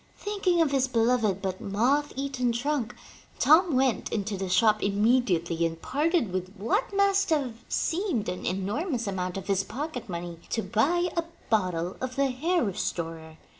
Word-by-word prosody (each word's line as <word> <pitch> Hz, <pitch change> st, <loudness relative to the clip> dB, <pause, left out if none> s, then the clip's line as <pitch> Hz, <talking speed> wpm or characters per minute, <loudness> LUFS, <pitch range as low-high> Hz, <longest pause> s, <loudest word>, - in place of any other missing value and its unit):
Thinking 390 Hz, -5 st, +1 dB
of 295 Hz, -, -1 dB
his 265 Hz, -1 st, +2 dB
beloved 230 Hz, -5 st, +1 dB
but 185 Hz, -1 st, -3 dB
moth 255 Hz, +9 st, +1 dB
eaten 265 Hz, -3 st, -1 dB
trunk, 245 Hz, -1 st, -1 dB, 0.4 s
Tom 320 Hz, +1 st, +5 dB
went 260 Hz, -2 st, +1 dB
into 210 Hz, -1 st, -2 dB
the 190 Hz, -1 st, -4 dB
shop 215 Hz, +3 st, +4 dB
im 200 Hz, +1 st, 0 dB
mediately 175 Hz, -9 st, +2 dB
and 165 Hz, -1 st, -1 dB
parted 300 Hz, -, 0 dB
with 185 Hz, +2 st, -4 dB
what 390 Hz, -, 0 dB
must 395 Hz, 0 st, +2 dB
have 255 Hz, -7 st, -1 dB
seemed 335 Hz, -, -1 dB
an 180 Hz, 0 st, -4 dB
enormous 235 Hz, -, -2 dB
amount 185 Hz, -2 st, -3 dB
of 195 Hz, -, -6 dB
his 195 Hz, -1 st, +1 dB
pocket 265 Hz, 0 st, -5 dB
money, 170 Hz, -1 st, -5 dB
to 225 Hz, -, -1 dB
buy 345 Hz, +11 st, +1 dB
a 335 Hz, -, +1 dB, 0.3 s
bottle 180 Hz, -4 st, 0 dB
of 255 Hz, 0 st, -4 dB
the 275 Hz, -1 st, +2 dB
hair 330 Hz, +7 st, +1 dB
restorer. 165 Hz, -5 st, -4 dB
235 Hz, 165 wpm, -27 LUFS, 190-295 Hz, 0.4 s, Tom